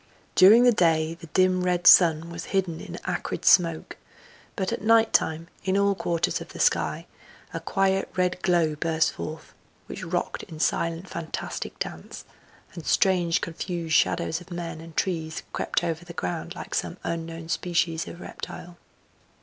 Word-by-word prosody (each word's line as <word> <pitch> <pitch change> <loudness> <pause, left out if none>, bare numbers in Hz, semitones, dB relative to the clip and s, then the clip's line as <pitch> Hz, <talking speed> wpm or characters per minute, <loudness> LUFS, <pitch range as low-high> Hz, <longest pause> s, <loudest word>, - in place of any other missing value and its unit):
During 215 +6 +8
the 245 - +6
day 165 -5 +2
the 165 0 -12
dim 185 +2 +2
red 180 -1 0
sun 165 -1 +6
was 170 0 -6
hidden 180 -4 -1
in - - -8
acrid - - -3
smoke, 165 -3 +3 0.6
but 190 -1 -2
at - - -4
night 225 +1 +4
time 160 +1 +1 0.2
in 190 +1 +1
all 200 0 +3
quarters 170 -3 -1
of - - -8
the - - -9
sky - - +1 0.5
a - - -3
quiet 195 -1 0
red 180 0 0
glow 170 -4 +2
burst 160 +1 +1
forth, 155 +1 -7 0.3
which - - -8
rocked - - -2
in 160 - -10
silent, 170 +2 0
fantastic 165 -3 -5
dance; - - -7 0.5
and 170 - -8
strange 180 -3 +2
confused 170 -1 -4
shadows 165 +2 +2
of 180 - -14
men 170 -2 -6
and 165 -1 -13
trees 160 -4 -2
crept - - -1
over 165 -1 -2
the 170 0 -10
ground 90 - -4
like - - -8
some - - -2
unknown 165 0 -4
species 170 -1 -1
of 175 - -9
reptile. 175 0 -9
170 Hz, 160 wpm, -25 LUFS, 165-185 Hz, 0.6 s, During